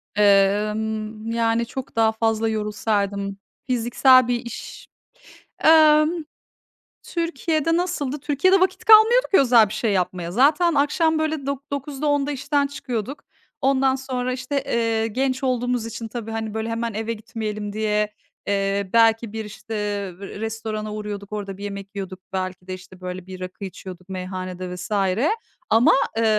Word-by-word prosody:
Emm, 215 +2 +2
yani, 230 0 +1
çok 255 +2 -7
daha 225 -1 +4
fazla 225 0 0
yorulsaydım. 205 -2 -1 0.3
Fiziksel 255 +1 +4
bir 245 0 -1
iş. 235 - -8 0.8
Emm, 310 -1 +7 0.9
Türkiye'de 330 -1 0
nasıldı? 300 -6 -2
Türkiye'de 295 +7 +3
vakit 370 +1 0
kalmıyordu 445 +3 +7
ki 385 - +6
özel 235 -5 +6
bir - - -6
şey 215 0 0
yapmaya. 180 -2 -1
Zaten 300 - +4
akşam, 315 +3 +2
böyle, 315 -3 -1
dok 280 0 -4
dokuzda, 280 +1 -3
10’da 290 0 +1
işten 280 +1 0
çıkıyorduk. 260 -1 -5 0.4
Ondan 270 -1 +3
sonra, 255 -1 -3
işte, 260 +2 -2
eee, 225 -1 0
genç 260 +4 -1
olduğumuz 245 -2 0
için 230 0 -6
tabii, 225 -1 -6
hani, 220 -1 -4
böyle, 220 +1 -3
hemen 230 0 -2
eve 225 +2 -2
gitmeyelim 215 -2 -5
diye, 210 0 0 0.3
eee, 200 -1 0
belki 225 -1 +4
bir, 220 -1 -4
işte, 210 +2 -9
ev 200 -3 -3
restorana 215 +1 -5
uğruyorduk, 210 -1 -6
orada 200 -2 -5
bir 200 - -9
yemek 200 0 -7
yiyorduk. 190 -1 -6
Belki 185 -1 -4
de, 185 - -4
işte, 185 0 -12
böyle, 180 0 -6
bir 185 -1 -8
rakı 185 +2 -7
içiyorduk 185 0 -10
meyhanede 185 -1 -5
vs. 185 +3 -8 0.8
ama, 225 +3 +5 0.3
eee, 230 - +2
225 Hz, 145 wpm, -23 LUFS, 205-265 Hz, 0.9 s, Emm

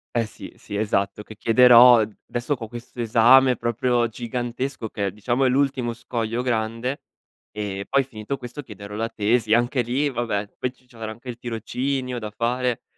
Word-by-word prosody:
Eh, 115 -2 +1
sì, - - -11
sì 100 - -8
esatto 100 -1 -1
che 110 - -12
chiederò 120 +1 +7 0.2
adesso 120 +4 -2
co 115 -3 -7
questo 120 +1 -8
esame 125 +3 +5
proprio 120 +1 +1
gigantesco 120 +2 -4
che, 100 -2 -2
diciamo, 120 +6 -1
è - - +4
l'ultimo 130 -2 +1
scoglio 115 0 -3
grande 115 +2 -2 0.5
e 100 -2 -4
poi 140 0 +3
finito 120 +1 -6
questo 125 +3 -8
chiederò 100 -4 -10
la 115 +2 -2
tesi. 110 +1 +1
Anche 120 +2 +1
lì 130 +5 0
vabbè, 110 -4 -2
poi 125 - -1
c 125 0 -30
c'avrò 115 -3 -7
anche 120 +3 -10
il 120 - -6
tirocinio 125 +2 -3
da 105 -2 -5
fare. 120 +2 -1
120 Hz, 165 wpm, -23 LUFS, 110-125 Hz, 0.5 s, chiederò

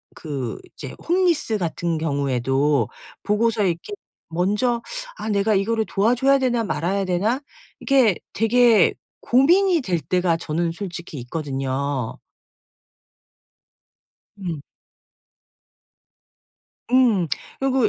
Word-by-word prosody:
그 140 -6 -5 0.2
이제 - - -8
홈리스 345 - +2
같은 170 -2 -2
경우에도 140 -3 +1 0.4
보고서 215 +1 +1
이렇게 175 - -2 0.4
먼저 210 +8 0 0.4
'아 220 - -4
내가 205 +1 +2
이거를 220 +3 +1
도와줘야 250 +7 +2
되나. 240 -3 +1
말아야 195 -1 -1
되나.' 205 +9 0 0.4
이게 255 -8 +3 0.2
되게 225 -1 +4 0.3
고민이 340 +7 +4
될 180 -7 -1
때가 170 +2 +1
저는 165 +1 -2
솔직히 170 -4 -7
있거든요. 135 -1 -3 2.2
음. 170 -6 -4 2.3
음. 235 -9 +4 0.3
그리고 265 -3 +2
아 - - +1
195 Hz, 210 characters per minute, -22 LUFS, 160-240 Hz, 2.3 s, 되게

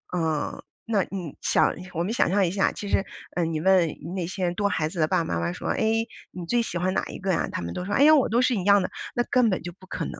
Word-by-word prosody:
嗯， 160 -3 -1 0.2
那 215 -4 +1
你 180 -7 -6
想 - - +2 0.2
我 170 0 -1
们 190 - -2
想 240 - +2
象 200 +1 +3
一 - - 0
下， 195 +1 +2
其 205 - -7
实， 195 - +2 0.3
嗯， 165 -2 0
你 155 - -1
问 185 -2 +4 0.3
那 180 -3 -2
些 185 0 -2
多 200 +3 0
孩 160 -5 0
子 170 - -7
的 155 - +3
爸 - - +2
爸 125 - -2
妈 - - -1
妈 85 +1 -1
说： - - -6
“哎， - - 0 0.5
你 180 -2 -7
最 240 +6 +2
喜 180 - -4
欢 185 +2 +1
哪 - - 0
一 - - -7
个 190 0 -1
呀？ 170 - 0
“他 - - -2
们 85 0 -5
都 180 - -4
说：” 205 - -3
哎 275 - +4
呀， 310 +1 +8
我 275 - +3
都 235 +3 +3
是 255 -1 +2
一 190 - -2
样 200 +1 +5
的。 185 - -2 0.3
“那 240 - +2
根 250 -3 +4
本 185 - -1
就 175 - -6
不 185 +2 -17
可 - - -4
能 - - -5
的。 - - -10
185 Hz, 325 characters per minute, -25 LUFS, 170-205 Hz, 0.5 s, 呀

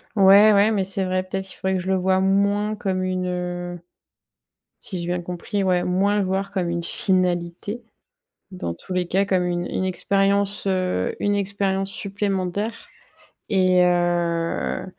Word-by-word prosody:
Ouais, 200 +1 +7
ouais, 205 +2 +4
mais 200 -3 +1
c'est 195 0 -1
vrai, 185 0 0
peut-être, 190 +1 -4
qu'il 185 - -9
faudrait 190 0 -1
que 185 - -1
je 190 - -2
le 190 - +2
vois 185 +1 +2
moins 200 +2 +1
comme 190 -4 -2
une, 185 0 -2
heu 175 0 -4 1.0
si 185 -3 -6
j'ai 170 - -4
bien 175 0 -2
compris, 180 +3 -3
ouais, 180 -1 +2
moins 195 +3 +1
le 200 - +1
voir 195 +1 -2
comme 185 -4 -2
une 170 0 -2
finalité. 180 +4 -1 0.7
Dans 180 - -4
tous 185 - -10
les 180 -1 -1
cas, 195 +2 +2
comme 185 -2 +1
une 175 0 -2
une 185 - -2
expérience, 200 +2 +1
heu, 185 - 0
une 205 0 +1
expérience 195 -1 -1
supplémentaire 200 +2 -2 0.6
et 185 -2 +4
heu, 175 -1 0
190 Hz, 165 wpm, -22 LUFS, 180-200 Hz, 1.0 s, Ouais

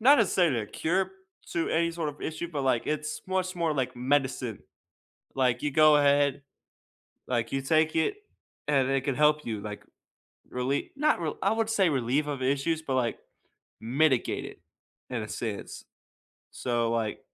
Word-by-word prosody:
not 275 +5 +7
necessarily 175 - +3
a 105 - -5
cure 185 - -1 0.4
to 165 - 0
any 170 +1 +2
sort 165 -2 -3
of 145 0 -8
issue, 160 +2 -4
but, 145 -4 -2
like, 130 -3 +1
it's 155 0 -2
much 185 0 -1
more 165 -3 0
like 130 -2 -1
medicine. 130 -3 0 0.8
Like, 130 -1 +1
you 150 - 0
go 155 +1 +6
ahead, 140 -1 +3 0.9
like, 120 -2 -1
you 135 - -1
take 155 +3 +2
it, 160 - +1 0.5
and 135 -3 +3
it 135 -1 +2
can 135 -1 -1
help 150 +1 +3
you, 110 -3 -3
like, 105 0 -7 0.7
really 130 +3 -2
not 300 -6 +2
real 160 -3 -3
I 195 - +2
wouldn't 225 0 0
say 200 -4 +3
relieve 135 +1 0
of 140 -3 -3
issues, 140 +5 0
but, 135 -5 -2
like, 120 -3 0 0.6
mitigate 130 +3 +1
it - - -10 0.5
in 120 -3 -2
a 105 - -5
sense. 110 -2 -5 0.7
So, 120 -2 -1
like, 115 -2 -1
145 Hz, 165 wpm, -28 LUFS, 125-160 Hz, 0.9 s, not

